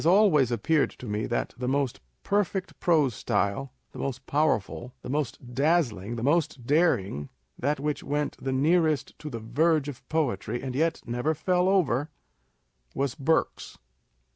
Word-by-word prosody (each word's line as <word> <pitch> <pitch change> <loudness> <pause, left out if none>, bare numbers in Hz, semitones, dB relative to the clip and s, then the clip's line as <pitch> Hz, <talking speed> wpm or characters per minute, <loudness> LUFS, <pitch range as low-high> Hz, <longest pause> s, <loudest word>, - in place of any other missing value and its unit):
It - - -5
has - - +4
always 175 - +5
appeared 140 +7 +2
to - - -12
me 105 -1 -2
that 120 - -2
the 125 - -2
most 135 -1 0 0.2
perfect 200 -2 -1
prose 155 -8 +3
style, 105 +6 -1 0.2
the - - -10
most 130 -1 -4
powerful, 125 -4 0
the - - -5
most 130 -4 -3
dazzling, 120 - +1
the 115 - -4
most 145 -4 +1
daring, 100 - +1 0.3
that 145 +3 0
which 150 0 -2
went 145 +1 -1
the 135 - -2
nearest 155 +2 +2
to 150 - -6
the 115 -4 -5
verge 150 +7 +2
of 140 -3 -9
poetry, 120 -7 -1
and 130 -2 -3
yet 160 +4 0
never 125 +6 -1
fell 180 +4 +2
over, 150 -7 +2 0.9
was 140 -2 0
Burke's. 160 +1 0
140 Hz, 160 wpm, -27 LUFS, 120-160 Hz, 0.9 s, always